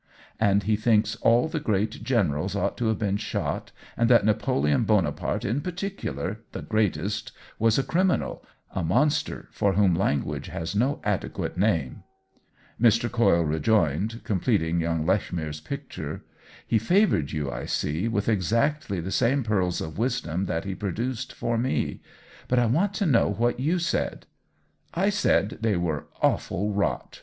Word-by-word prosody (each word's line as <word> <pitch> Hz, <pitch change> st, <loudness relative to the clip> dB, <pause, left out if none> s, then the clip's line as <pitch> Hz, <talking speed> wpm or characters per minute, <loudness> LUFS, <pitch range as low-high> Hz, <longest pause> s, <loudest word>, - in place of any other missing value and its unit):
"And 100 Hz, -2 st, +3 dB
he 105 Hz, +2 st, +2 dB
thinks 110 Hz, 0 st, +2 dB
all 115 Hz, +5 st, +3 dB
the 160 Hz, 0 st, -2 dB
great 110 Hz, -6 st, -1 dB
generals 100 Hz, -, 0 dB
ought -, -, 0 dB
to 120 Hz, -, 0 dB
have 110 Hz, -, +1 dB
been 100 Hz, -2 st, 0 dB
shot, 105 Hz, -, -3 dB, 0.2 s
and 115 Hz, 0 st, +2 dB
that 120 Hz, -4 st, +6 dB
Napoleon 100 Hz, -9 st, +2 dB
Bonaparte -, -, 0 dB
in 120 Hz, +8 st, 0 dB
particular, 180 Hz, -, -4 dB
the -, -, -5 dB
greatest, 105 Hz, -1 st, -1 dB, 0.3 s
was 115 Hz, 0 st, +3 dB
a 135 Hz, -, +2 dB
criminal, 185 Hz, +4 st, 0 dB, 0.3 s
a 95 Hz, -, -2 dB
monster 130 Hz, -, +1 dB
for 100 Hz, -1 st, +1 dB
whom 100 Hz, -2 st, +4 dB
language 80 Hz, -6 st, -1 dB
has 80 Hz, +4 st, -4 dB
no 130 Hz, +7 st, +1 dB
adequate 105 Hz, -3 st, -2 dB
name 90 Hz, -, 0 dB, 0.4 s
!" -, -, -25 dB
Mr. 115 Hz, 0 st, +4 dB
Coyle 115 Hz, -8 st, +3 dB
rejoined, 85 Hz, -, +1 dB
completing 90 Hz, -5 st, +1 dB
young 80 Hz, -1 st, -1 dB
Lechmere's 80 Hz, -5 st, -1 dB
picture. 140 Hz, -1 st, -6 dB, 0.2 s
" -, -, -22 dB
He -, -, +5 dB
favored 175 Hz, -, +2 dB
you, 75 Hz, -3 st, -2 dB
I -, -, -5 dB
see, 80 Hz, +9 st, -1 dB
with 105 Hz, -3 st, -1 dB
exactly 115 Hz, -, +1 dB
the 95 Hz, +4 st, -5 dB
same 130 Hz, +6 st, +2 dB
pearls 95 Hz, -5 st, 0 dB
of 80 Hz, +4 st, -6 dB
wisdom 100 Hz, -7 st, -1 dB
that 80 Hz, +1 st, -2 dB
he 95 Hz, -, -3 dB
produced 115 Hz, +7 st, -3 dB
for 115 Hz, -1 st, -2 dB
me. 130 Hz, +3 st, -1 dB, 0.5 s
But 125 Hz, -, +1 dB
I 120 Hz, -, +4 dB
want 180 Hz, -, +1 dB
to 205 Hz, -, 0 dB
know 130 Hz, -, +3 dB
what 120 Hz, +5 st, 0 dB
you 155 Hz, +7 st, +1 dB
said." 170 Hz, -, -2 dB, 0.7 s
"I 195 Hz, +4 st, +2 dB
said 110 Hz, -, +1 dB
they 110 Hz, -4 st, +1 dB
were 80 Hz, -4 st, -2 dB, 0.2 s
awful 105 Hz, +4 st, +1 dB
rot!" 100 Hz, 0 st, -2 dB
105 Hz, 160 wpm, -26 LUFS, 90-120 Hz, 0.7 s, that